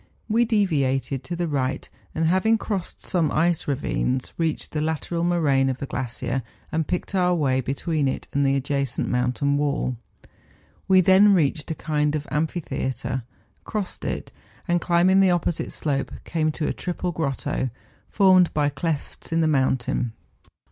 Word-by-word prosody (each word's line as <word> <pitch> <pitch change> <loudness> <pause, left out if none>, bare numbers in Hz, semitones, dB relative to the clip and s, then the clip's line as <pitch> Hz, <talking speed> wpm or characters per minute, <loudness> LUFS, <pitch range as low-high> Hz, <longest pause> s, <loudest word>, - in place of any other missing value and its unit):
We 235 +2 +3
deviated 140 - +1
to 175 - -3
the 170 0 -1
right, 135 -3 -1 0.3
and 160 - +1
having 190 +7 +3
crossed 200 -4 -4
some 165 -5 +1
ice 170 +1 +1
ravines, 130 -2 -1
reached 165 -2 -2
the 150 - -1
lateral 160 +2 -2
moraine 145 -6 +2
of 130 - -2
the 140 - -4
glacier, 125 0 -3 0.3
and 160 -1 -1
picked 180 +2 -3
our 180 -2 +3
way 130 -5 +1
between 140 +3 -1
it 130 - -3
and 140 - +2
the 135 0 +3
adjacent 140 -2 -1
mountain 125 +3 +1
wall. 140 -3 0 0.9
We 190 -1 +6
then 195 +3 +6
reached 150 -2 0
a 160 - -2
36 - - -18
MOUNTAIN 150 -1 +2
ADVENTURES. 150 - 0
kind - - 0
of 150 -1 -4
amphitheatre, 130 -5 -2 0.4
crossed 210 -4 -4
it, - - -4 0.4
and, 175 -1 +2
climbing 180 +2 +4
the 195 -1 +5
opposite 175 -2 0
slope, 140 -3 -2
came 155 -2 0
to 150 - -2
a - - 0
triple 180 0 -3
grotto, 135 -4 -2 0.4
formed 185 -3 +5
by 145 -1 +2
clefts 145 +2 -4
in 165 0 +2
the 160 - +3
mountains. 130 -4 +1
155 Hz, 165 wpm, -24 LUFS, 135-175 Hz, 0.9 s, We